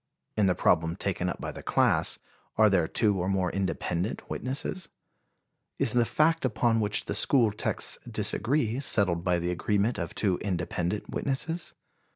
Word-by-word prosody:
In 105 -2 +3
the 90 - +2
problem 80 0 +2
taken 90 -2 -2
up - - -5
by - - -4
the - - -9
class, - - +2 0.4
are 110 -1 +5
there 90 -4 +3
two 105 +1 +1
or 90 +2 -1
more 95 -3 +1
independent 95 0 -2
witnesses? 145 +7 -3 0.9
Is 110 - +1
the 120 -1 +4
fact 160 +6 +2
upon 115 -2 +2
which 105 -1 0
the - - -3
school 120 -6 +3
texts 105 - -2
disagree 125 -2 0
settled 95 -10 +1
by 90 -1 +2
the 85 +1 -1
agreement 105 +6 0
of 85 - -4
two 95 -4 +1
independent 90 +1 -2
witnesses? 160 +5 -2
105 Hz, 160 wpm, -28 LUFS, 90-120 Hz, 0.9 s, are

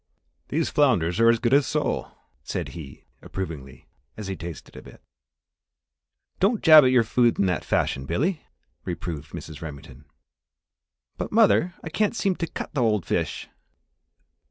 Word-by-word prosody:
"These 160 +2 -1
flounders 110 - +2
are 115 0 +6
as 115 - +4
good 120 +2 0
as 140 -1 +4
sole," - - -1 0.3
said - - -4
he, 75 -6 -11 0.2
approvingly, 80 -8 -7 0.3
as 105 - -6
he 95 0 -4
tasted 85 -1 -9
a - - -9
bit. - - -15 1.4
"Don't 205 +4 +1
jab 155 -2 +9
at 130 - +4
your 125 -2 +4
food 120 +1 +2
in 100 - +2
that 90 -3 -1
fashion, 65 0 -1
Billy!" 155 - -1 0.4
reproved 85 -4 -5
Mrs. 80 -3 -9
Remington. 70 -3 -10 1.1
"But, - - -4
mother, 205 -5 +3
I 160 - -5
can't 210 +7 0
seem 195 -4 0
to 165 - -2
cut - - -7
the 145 - 0
old 105 -5 +1
fish!" - - -2
115 Hz, 155 wpm, -24 LUFS, -, 1.4 s, jab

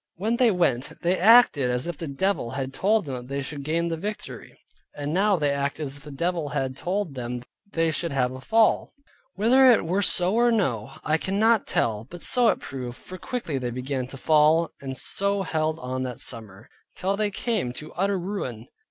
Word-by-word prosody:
When 220 +7 -1
they 245 -2 +5
went, 160 - +1
they 180 +2 +1
acted 195 - +6
as 125 0 0
if 175 -1 -4
the 165 - -6
devil 140 -1 -1
had 135 +2 -4
told 210 +6 +1
them 135 - -5
that 125 -1 -6
they 140 +1 -3
should 145 +1 -6
gain 165 +4 -1
the 165 -1 -2
victory; 210 +5 -7 0.4
and 145 +1 -4
now 200 +3 +3
they 145 -4 +1
acted 140 +2 -2
as 140 0 -7
if 145 - -16
the - - -9
devil 165 +1 -2
had 130 0 -2
told 185 0 -2
them 125 -1 -5 0.3
they 165 -1 +1
should 165 +1 -2
have 125 -2 +1
a 130 0 -8
fall. 220 - +2 0.4
Whither 250 +7 +5
it 225 - +3
were 185 +5 0
so 185 -1 +3
or 240 +1 +4
no, 135 - 0
I 155 +1 +1
cannot 215 +4 +2
tell, 110 -1 0
but 175 -1 -8
so 245 -2 +4
it - - +2
proved, 125 -3 -7
for 185 0 -10
quickly 170 - -3
they 125 -1 -3
began 130 +1 -3
to 135 - -9
fall, 155 +3 +3
and 135 -1 -5
so 200 +5 0
held 155 -2 -1
on 130 -3 -4
that 125 -2 -4
summer, 110 -3 -5 0.3
till 195 +2 -1
they 210 0 +1
came 205 - -2
to 155 +4 -8
utter 195 +3 0
ruin. 170 - -5
160 Hz, 205 wpm, -25 LUFS, 130-195 Hz, 0.4 s, acted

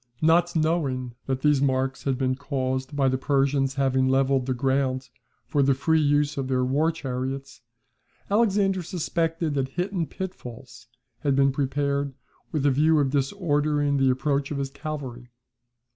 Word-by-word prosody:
Not 170 +2 +3
knowing 145 -6 0
that 130 -1 -1
these 150 -2 +3
marks 135 -1 0
had 135 -2 +1
been 130 -1 +1
caused 130 0 -3
by 140 -2 +2
the 130 0 +1
Persians 135 -1 +1
having 130 -1 +2
levelled 135 0 +2
the 130 - +1
ground 130 0 0 0.4
for 145 - +1
the 135 0 +3
free 160 +4 +2
use 145 0 +2
of 135 -1 -2
their 130 -1 +1
war 145 +6 +2
chariots, 135 -1 -5 0.7
Alexander 200 -3 +2
suspected 165 -2 -1
that 135 -2 0
hidden 175 +3 -2
pitfalls 125 -9 -8 0.3
had 140 -2 +1
been 135 0 +4
prepared 140 0 -1 0.4
with 150 -3 -1
a 145 - +5
view 155 +4 +3
of 135 -2 +1
disordering 145 -1 +1
the 135 -1 +3
approach 140 +2 0
of 145 - -3
his 135 -1 -3
cavalry. 135 -5 -6
140 Hz, 155 wpm, -25 LUFS, 130-150 Hz, 0.7 s, a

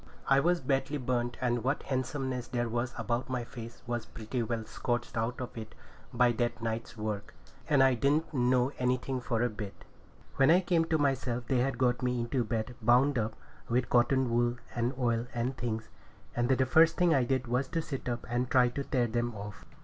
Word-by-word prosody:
I 135 0 +5
was 175 +4 +2
badly 135 +2 0
burnt, 120 -2 -1
and 120 -2 0
what 135 +4 0
handsomeness 130 -1 -2
there 120 -1 -1
was 120 +2 -1
about 120 +2 -2
my 125 -2 -1
face 115 -1 -10
was 120 -2 -3
pretty 110 +3 -4
well 115 -1 -2
scorched 120 +2 -3
out 115 +2 -1
of 125 -1 -6
it 110 -1 -8 0.4
by 125 -1 +4
that 120 +1 -1
night's 115 +1 -4
work; 105 -2 -4 0.3
and 140 -3 +5
I 135 -1 +5
didn't 145 +7 +1
know 125 0 +2
anything 125 +1 0
for 120 -1 0
a - - +3
bit. 105 -2 -8 0.5
When 135 - +5
I 175 +3 +6
come 175 -3 +2
to 160 -1 +1
myself, 130 -4 0
they 130 - +2
had 135 +2 0
got 125 -2 +2
me 125 -1 0
into 120 +2 0
bed 110 +2 -2
bound 125 +4 +4
up 110 0 -2 0.3
with 125 +1 0
cotton 125 +1 +3
wool 120 +1 +2 0.2
and 120 +1 0
oil 120 -2 0
and 120 +3 -1
things. 115 -3 -3 0.5
And 120 +1 +1
the 130 0 +3
first 160 +6 +5
thing 175 -2 +4
I 135 - +3
did 130 +1 0
was 125 +3 0
to 165 - -2
sit 135 -5 -4
up 120 0 -3
and 120 +1 -1
try 125 -1 +5
to 140 +3 -4
tear 125 -3 +1
them 120 0 -1
off. 100 -1 -8
125 Hz, 205 wpm, -30 LUFS, 120-130 Hz, 0.5 s, I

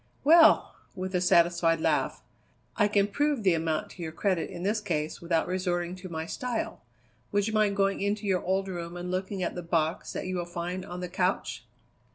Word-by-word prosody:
"Well!" 325 +3 +6 0.2
with 185 0 -4
a 180 - +1
satisfied 170 -2 +4
laugh, - - 0 0.5
"I 210 - +3
can 205 -1 +3
prove 285 +3 0
the 185 -3 +4
amount 160 -1 -1
to 180 - -11
your 160 -1 -4
credit 180 +1 0
in 175 -2 -7
this 210 +3 0
case 155 -6 -2
without 170 -1 +1
resorting 180 -1 -1
to 185 0 -9
my 160 -1 -4
style. 245 +6 -3 0.5
Would 205 -1 +2
you 220 - -2
mind 210 -2 +2
going 195 0 +1
into 205 +1 -1
your 190 -2 +1
old 190 +1 0
room 175 -2 -5
and 180 0 -5
looking 190 +1 -2
at - - -2
the 180 - -5
box 165 -1 -1
that - - -4
you 185 0 -2
will 175 - -2
find 175 +2 -4
on 180 -1 -7
the 180 - -3
couch?" 180 +2 -1
185 Hz, 205 wpm, -28 LUFS, 170-200 Hz, 0.5 s, Well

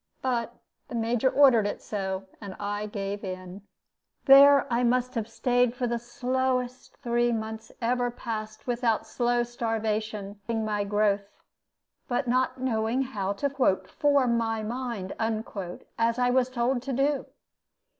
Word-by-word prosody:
But 240 -2 -1 0.3
the - - -7
Major 235 +2 +1
so - - -9
ordered 255 -7 +6
it, 205 - -6
and 195 0 -4
I 205 +1 -3
gave 200 -1 -4
in. 185 0 -7 0.6
There 280 0 +8
I 235 - +2
must 250 +1 +1
have 225 -4 -2
staid 245 +1 +1
for 250 - -1
the 235 0 -1
slowest 250 +1 -2
three 240 0 +2
mouths 220 -1 -4
ever 245 +1 +1
passed 215 -2 -6
without 235 -3 0
slow 240 +2 +1
starvation 220 -3 -3
finishing 225 -2 -1
my 210 -1 -1
growth, 205 -1 +1 0.8
but 245 +1 -1
not 255 +1 +1
knowing 240 0 0
how 200 -6 -2
to 270 -4 +1
"form 275 -5 +2
my 225 -1 -1
mind," 235 -4 -4 0.9
as 230 +1 +2
I 245 0 +2
was 255 0 +2
told 250 0 0
to 270 +2 -4
do. 275 +1 +1
235 Hz, 140 wpm, -27 LUFS, 215-250 Hz, 0.9 s, There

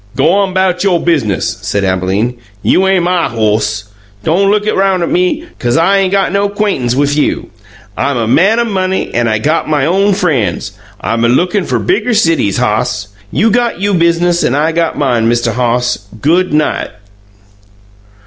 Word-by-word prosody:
"G'on 190 +8 +2
'bout 185 -1 +1
you 190 -3 +2
biz'nis," 140 - -1
said 100 -1 -2
Abalene; 95 +5 0 0.3
"you 190 +1 +3
ain' 190 -2 +2
MY 175 -3 0
hoss. 105 -2 -1 0.4
Don' 190 - +2
look 210 0 +1
roun'at 190 -4 +1
me, 180 - 0
'cause 120 +2 0
I 190 +5 +3
ain't 190 -1 0
got 195 -1 +1
no 200 +1 +1
'quaintance 200 - -1
wif 145 +1 +1
you. 150 - -1 0.4
I'm 140 -1 -1
a 115 -2 -1
man 195 - +3
o' - - +3
money, 190 -4 -2
an' 120 0 +1
I 110 -1 +1
got 155 +8 -1
my 145 -3 +1
own 195 +4 +2
frien's; 120 - -1 0.3
I'm 115 0 -1
a 120 - +3
lookin' 180 - +1
fer - - -1
bigger 305 - 0
cities, 165 - +1
hoss. 110 -3 -1 0.2
You 225 +2 +2
got 240 -3 0
you 200 +1 0
biz'nis 170 0 +2
an' 130 - +1
I 155 +3 +1
got 165 0 -1
mine. 120 -5 +1
Mista' 120 0 +1
Hoss, 125 0 0 0.2
good 175 - +1
night!" 150 0 0
165 Hz, 170 wpm, -13 LUFS, 120-190 Hz, 0.4 s, you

